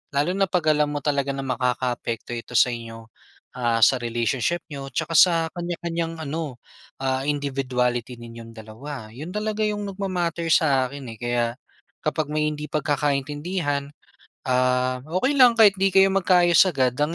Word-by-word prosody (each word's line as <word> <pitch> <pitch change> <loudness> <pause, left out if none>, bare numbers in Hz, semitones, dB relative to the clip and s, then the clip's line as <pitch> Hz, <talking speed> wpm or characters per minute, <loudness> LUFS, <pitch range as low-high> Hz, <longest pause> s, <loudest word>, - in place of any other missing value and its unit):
lalo 145 +6 +2
na 195 - +2
pag 165 -4 +2
alam 150 0 +1
mo 145 - -2
talaga 140 -2 0
na - - -5
makakaapekto 125 -2 -2
ito 115 - -8
sa 120 - +6
inyo 115 -1 -8 0.5
ah 115 -1 +1
sa 130 - +6
relationship 120 +7 -1
niyo 140 -1 -6
tsaka 165 +2 -2
sa 180 -2 +7 0.2
kanya-kanyang 170 -1 -4
ano, 145 -4 -5 0.4
ah 130 0 0
individuality 130 -4 -1
ninyong 115 -1 -11
dalawa. 110 +2 -9
Yun 155 - -8
talaga 215 0 -1
yung 205 -1 -3
nagma-matter 180 -4 -2
sa 135 -5 +3
akin 135 -2 -9
eh, - - -19
kaya 120 0 0 0.6
kapag 155 -1 -1
may 150 0 0
hindi 150 0 -6
pagkakaintindihan, 145 +1 -1 0.6
ah, 125 0 +1
okey 185 - 0
lang 245 -2 +7
kahit 205 -3 +7
hindi 195 0 +3
kayo 195 0 +6
magkaayos 175 -3 +4
agad, 130 -5 +1
ang 150 +3 0
145 Hz, 155 wpm, -23 LUFS, 125-170 Hz, 0.6 s, sa